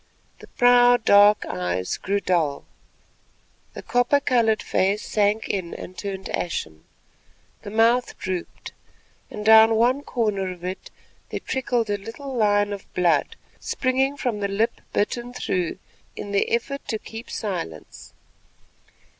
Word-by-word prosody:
The - - -13
proud 245 -1 +4
dark 205 +1 +6
eyes 90 0 -2
grew 200 +1 -1
dull, 165 -7 0 1.1
the - - -8
copper 245 +3 +2
coloured 230 -5 +1
face 195 +3 0
sank 210 +1 +1
in 185 -4 -3
and 185 - -9
turned 195 -1 -5
ashen, 80 - -4 0.8
the - - -8
mouth 230 +3 +2
drooped, 185 -2 -5 0.6
and 210 0 -7
down 220 +1 +7
one 245 +5 +2
corner 210 -8 -1
of 175 -1 -11
it 185 +1 -6 0.4
there - - -4
trickled 245 -4 -1
a 205 - -1
little 265 +7 -8
line 205 -2 +2
of 200 - -9
blood 180 - +2 0.2
springing 265 +2 0
from 245 -6 -2
the 200 - -1
lip 220 +4 -1
bitten 240 +4 -2
through 180 -7 -2 0.4
in 205 - -7
the 200 - +1
effort 275 +4 -1
to 220 - -1
keep 225 +2 -10
silence. 175 - -6
210 Hz, 135 wpm, -23 LUFS, 190-240 Hz, 1.1 s, down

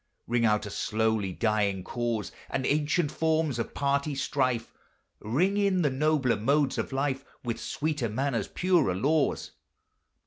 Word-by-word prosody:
Ring 120 0 +1
out 105 -1 +2
a 105 - -6
slowly 110 -3 0
dying 100 -2 0
cause, 120 -2 -2 0.2
And 130 - -1
ancient 150 +2 +1
forms 160 -5 0
of 115 - -4
party 140 +1 0
strife; 130 -4 -1 0.5
Ring 175 - +1
in 195 -3 +2
the 145 - +2
nobler 140 -2 +2
modes 140 +5 +1
of - - -3
life, 135 0 -1 0.2
With 115 -2 -3
sweeter 150 -5 -2
manners, 130 +2 -1
purer 175 - +2
laws. 140 +8 +1
135 Hz, 140 wpm, -28 LUFS, 115-150 Hz, 0.5 s, out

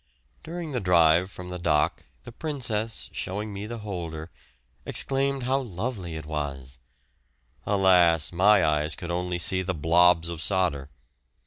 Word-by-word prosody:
During 170 -1 -6
the 125 - -1
drive 85 -1 +4
from 90 -1 -10
the 90 - -5
dock 75 -3 0 0.2
the 120 - -10
Princess, 115 -6 -3
showing 105 +3 -4
me 100 +2 -6
the 120 +1 -6
holder, 85 -4 -6 0.5
exclaimed 135 0 +1
how 130 +2 +1
lovely 100 -6 -5
it 80 -1 -7
was; 70 -4 -5 0.9
alas! 90 -6 +3
my 95 +2 +4
eyes 75 0 0
could 85 -1 -6
only 90 0 -2
see 95 +2 +1
the 95 -1 -3
"blobs" 85 +2 +4
of 85 -2 -5
solder! 80 -7 +1
90 Hz, 140 wpm, -26 LUFS, 80-105 Hz, 0.9 s, drive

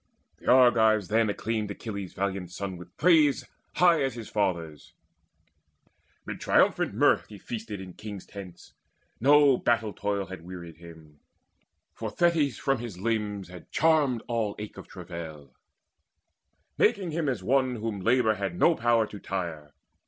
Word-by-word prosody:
The - - -15
Argives 110 -6 +5
then 110 0 +2
Acclaimed 110 0 -2
Achilles' 100 -2 -6
valiant 95 -2 -3
son 95 +1 -5
with 90 0 -13
praise 155 -5 +4 0.3
High 170 -3 +5
as 135 -3 -1
his 115 -2 -8
father's. 85 -7 -2 1.3
Mid - - -6
triumphant - - +2
mirth - - +3
He 105 - -11
feasted 110 -1 -6
in 95 -1 -9
kings' 105 -2 -8
tents: 95 -4 -11 0.5
no 145 +1 +6
battle 115 -3 0
toil 100 -1 -2
Had 95 -2 -9
wearied 85 -2 -9
him; 80 -3 -14 0.7
for - - -5
Thetis 160 -8 +1
from 135 -3 0
his 115 -6 -7
limbs 105 -2 -2
Had 90 -1 -12
charmed 150 -7 +2
all 115 -4 -1
ache 105 0 -8
of - - -10
travail, 80 -6 -9 1.3
making 185 -4 +2
him 155 -2 -1
As 115 -8 -3
one 130 +3 +2
whom 110 -2 -4
labour 115 +1 +3
had 100 -4 -4
no 170 - +5
power 115 -4 +2
to 105 -1 -10
tire. 85 -7 -5
105 Hz, 145 wpm, -27 LUFS, 90-125 Hz, 1.3 s, no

